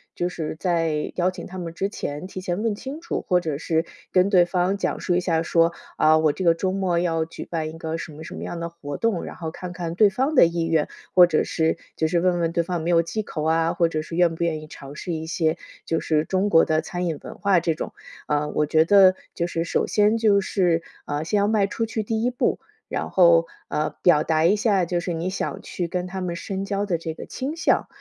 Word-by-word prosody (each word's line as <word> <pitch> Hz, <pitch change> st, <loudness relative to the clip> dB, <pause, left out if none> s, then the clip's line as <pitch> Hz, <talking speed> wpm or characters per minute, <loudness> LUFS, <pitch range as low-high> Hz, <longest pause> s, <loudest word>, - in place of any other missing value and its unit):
就 175 Hz, -, -1 dB
是 160 Hz, -3 st, -4 dB
在 165 Hz, -4 st, 0 dB
邀 180 Hz, +1 st, +1 dB
请 -, -, -8 dB
他 185 Hz, -, -9 dB
们 170 Hz, -2 st, -5 dB
之 195 Hz, +3 st, -2 dB
前 150 Hz, -3 st, -5 dB
提 190 Hz, -, -7 dB
前 185 Hz, +2 st, -3 dB
问 225 Hz, -2 st, 0 dB
清 270 Hz, +8 st, -7 dB
楚， 340 Hz, -, -4 dB
或 180 Hz, -1 st, +3 dB
者 155 Hz, -5 st, -2 dB
是 160 Hz, +1 st, 0 dB, 0.3 s
跟 185 Hz, +1 st, +4 dB
对 180 Hz, -4 st, +5 dB
方 180 Hz, +2 st, 0 dB
讲 -, -, -2 dB
述 175 Hz, -, 0 dB
一 -, -, +3 dB
下 165 Hz, -2 st, 0 dB
说， 165 Hz, +1 st, +3 dB, 0.2 s
啊， 155 Hz, 0 st, +5 dB
我 155 Hz, -1 st, +3 dB
这 185 Hz, +5 st, -4 dB
个 165 Hz, -1 st, +5 dB
周 185 Hz, +2 st, -1 dB
末 190 Hz, -3 st, 0 dB
要 165 Hz, -2 st, +1 dB
举 165 Hz, -, -9 dB
办 160 Hz, -2 st, -3 dB
一 160 Hz, -, -9 dB
个 160 Hz, 0 st, -4 dB
什 165 Hz, -, -7 dB
么 155 Hz, +2 st, -10 dB
什 -, -, -8 dB
么 -, -, -6 dB
样 170 Hz, -, -5 dB
的 170 Hz, -, -3 dB
活 150 Hz, -4 st, -7 dB
动。 230 Hz, -, +1 dB, 0.2 s
然 -, -, -8 dB
后 160 Hz, -2 st, -5 dB
看 180 Hz, +2 st, -7 dB
看 170 Hz, -2 st, -4 dB
对 210 Hz, +2 st, +6 dB
方 265 Hz, +10 st, 0 dB
的 255 Hz, -, +8 dB
意 170 Hz, 0 st, -1 dB
愿， 160 Hz, -2 st, +2 dB, 0.3 s
或 180 Hz, -1 st, +9 dB
者 155 Hz, -3 st, +2 dB
是 160 Hz, 0 st, 0 dB, 0.2 s
就 160 Hz, -, +1 dB
是 170 Hz, +2 st, +1 dB
问 180 Hz, -1 st, +2 dB
问 165 Hz, -1 st, 0 dB
对 170 Hz, -1 st, +1 dB
方 170 Hz, -1 st, -3 dB
没 165 Hz, -, -2 dB
有 165 Hz, -1 st, +5 dB
忌 190 Hz, +6 st, -3 dB
口 155 Hz, -6 st, -5 dB
啊， 165 Hz, +1 st, +2 dB
或 170 Hz, -1 st, +2 dB
者 155 Hz, -1 st, -2 dB
是 155 Hz, +2 st, -7 dB
愿 175 Hz, -1 st, +3 dB
不 170 Hz, -, -2 dB
愿 155 Hz, -2 st, -1 dB
意 155 Hz, -, -11 dB
尝 140 Hz, -1 st, -11 dB
试 175 Hz, -, -5 dB
一 160 Hz, -1 st, -3 dB
些 160 Hz, 0 st, 0 dB, 0.3 s
就 165 Hz, -, 0 dB
是 155 Hz, -1 st, +1 dB
中 190 Hz, +3 st, 0 dB
国 165 Hz, -, +6 dB
的 155 Hz, 0 st, +1 dB
餐 180 Hz, 0 st, -4 dB
饮 160 Hz, -3 st, -2 dB
文 -, -, -9 dB
化 200 Hz, -3 st, +3 dB
这 165 Hz, -1 st, 0 dB
种。 155 Hz, -, -6 dB, 0.3 s
啊， 150 Hz, 0 st, 0 dB
我 150 Hz, -, +1 dB
觉 160 Hz, +1 st, +4 dB
得 190 Hz, 0 st, +6 dB, 0.2 s
就 170 Hz, -, -1 dB
是 165 Hz, -1 st, -2 dB
首 170 Hz, -, 0 dB
先 210 Hz, +1 st, +3 dB
就 210 Hz, -3 st, +4 dB
是， 175 Hz, -4 st, +1 dB, 0.2 s
啊， 145 Hz, +1 st, -2 dB
先 205 Hz, +6 st, 0 dB
要 200 Hz, -, +2 dB
迈 210 Hz, -2 st, +3 dB
出 225 Hz, +3 st, -2 dB
去 220 Hz, -1 st, -2 dB
第 220 Hz, +1 st, -1 dB
一 245 Hz, -, +2 dB
步， 250 Hz, -, 0 dB, 0.3 s
然 -, -, -3 dB
后， 170 Hz, -2 st, +5 dB, 0.2 s
呃， 150 Hz, 0 st, -1 dB
表 155 Hz, -4 st, +5 dB
达 160 Hz, 0 st, +2 dB
一 195 Hz, +5 st, +5 dB
下 205 Hz, -4 st, +2 dB
就 175 Hz, 0 st, -1 dB
是 175 Hz, 0 st, -3 dB
你 165 Hz, +3 st, -2 dB
想 190 Hz, -, -4 dB
去 175 Hz, -2 st, -4 dB
跟 180 Hz, +1 st, -3 dB
他 190 Hz, +1 st, -5 dB
们 175 Hz, -2 st, -3 dB
深 195 Hz, +2 st, -4 dB
交 200 Hz, 0 st, -1 dB
的 180 Hz, -4 st, 0 dB
这 160 Hz, -1 st, -4 dB
个 -, -, -8 dB
倾 280 Hz, +5 st, -4 dB
向， -, -, +2 dB
170 Hz, 280 characters per minute, -24 LUFS, 160-190 Hz, 0.3 s, 或